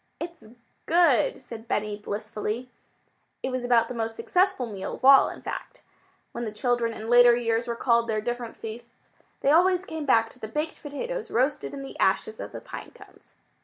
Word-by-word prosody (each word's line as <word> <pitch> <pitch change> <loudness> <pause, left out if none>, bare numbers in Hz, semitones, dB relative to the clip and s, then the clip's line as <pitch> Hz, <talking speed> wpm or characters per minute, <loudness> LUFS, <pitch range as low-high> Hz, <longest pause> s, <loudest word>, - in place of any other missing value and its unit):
"It's 335 0 -7 0.4
good," 350 +9 +4
said 230 -3 -10
Benny 210 -1 -1
blissfully. 215 +3 -4 0.7
It 260 - -1
was 255 -1 -2
about 235 -2 +3
the - - -6
most 225 -1 -3
successful 365 - +1
meal 200 -4 -5
of - - -6
all, 270 0 +8
in - - -10
fact. - - -7 0.5
When 240 - -5
the 220 - -3
children 235 +2 0
in 220 0 -7
later 240 0 +7
years 230 0 0
recalled 235 0 +2
their 220 -1 0
different 240 +1 -4
feasts, 235 +2 -10 0.3
they 275 - +3
always 365 +3 +4
came 315 -4 -5
back 225 -3 +4
to - - -16
the 220 - -6
baked 300 +8 -4
potatoes 460 - -5
roasted 260 +5 0
in 275 - -6
the 270 - -10
ashes 440 - +1
of - - -6
the - - -8
pine - - -9
cones. - - -18
240 Hz, 185 wpm, -26 LUFS, 225-285 Hz, 0.7 s, all